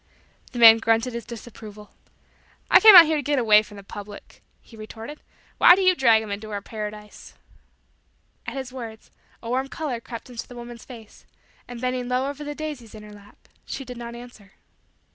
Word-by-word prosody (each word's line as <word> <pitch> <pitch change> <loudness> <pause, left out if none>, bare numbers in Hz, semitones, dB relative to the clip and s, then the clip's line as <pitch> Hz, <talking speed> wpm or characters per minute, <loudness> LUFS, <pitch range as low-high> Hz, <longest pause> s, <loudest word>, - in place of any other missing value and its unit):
The 245 - -9
man 225 -1 +8
grunted 225 +2 0
his 235 0 -6
disapproval. 215 -3 -11 0.8
"I - - +8
came 430 -2 +9
out 345 -2 +11
here 310 0 0
to - - -2
get 290 +1 -1
away 215 -4 +5
from 210 -1 -14
said 200 -1 -14
public," 205 0 -11 0.2
he 230 - -18
retorted. 225 +6 -10 0.4
"Why 355 - +8
do 385 - -1
you 370 0 +5
drag 230 -8 +3
'em 210 - -8
into 210 +2 -6
our 205 -1 -4
paradise?" 210 0 -9 1.1
At - - -6
his 260 -1 -7
words, 225 -4 -10 0.3
a 230 - -7
warm 260 +2 -1
color 270 -5 -5
crept 230 -1 -10
into 235 - -8
the 245 - -13
woman's 240 -1 -11
face, 225 -4 -14 0.4
and, 245 -1 -9
bending 250 0 -3
low 255 +2 -1
over 285 +1 -7
the 295 0 -6
daisies 290 -8 -8
in 215 - -11
her 210 0 -13
lap, 205 0 -19 0.2
she 270 - -7
did 250 0 -9
not 235 0 -8
answer. 235 -5 -14
235 Hz, 195 wpm, -23 LUFS, 215-260 Hz, 1.1 s, out